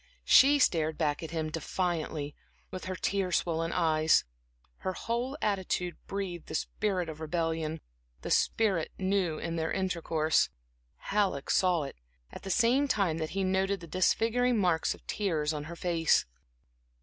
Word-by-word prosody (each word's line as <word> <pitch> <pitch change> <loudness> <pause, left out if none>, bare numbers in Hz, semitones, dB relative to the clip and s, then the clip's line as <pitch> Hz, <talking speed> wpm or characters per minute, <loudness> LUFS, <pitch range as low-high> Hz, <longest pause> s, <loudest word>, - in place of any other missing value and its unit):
She 285 +2 +7
stared 160 - +2
back 150 -2 0
at 160 - -6
him 160 -2 -3
defiantly, 160 -3 -2 0.4
with 185 - -6
her 185 0 -3
tear 195 -1 -1
swollen 165 -1 0
eyes. 160 -2 +3 0.5
Her 185 - -3
whole 240 +7 -3
attitude 190 -3 -1
breathed 190 -4 -4
the - - -5
spirit 185 +1 -1
of 160 -1 -7
rebellion; 160 -1 -2 0.4
a - - -4
spirit 195 -8 +2
new 190 -4 0
in 165 +1 -4
their 160 0 -1
intercourse. 165 -4 +1 0.5
Halleck 195 -9 -1
saw 180 -4 +3
it, 140 - -8 0.3
at - - -9
the 195 - -7
same 245 +7 +3
time 190 - +1
that 155 -1 -2
he 195 - +1
noted 190 +1 +1
the 170 - -9
disfiguring 230 +8 +2
marks 175 -5 +1
of - - -22
tears 160 -7 -1
on 150 -1 -4
her 170 +2 -7
face. 170 -2 +2
175 Hz, 150 wpm, -30 LUFS, 160-195 Hz, 0.5 s, She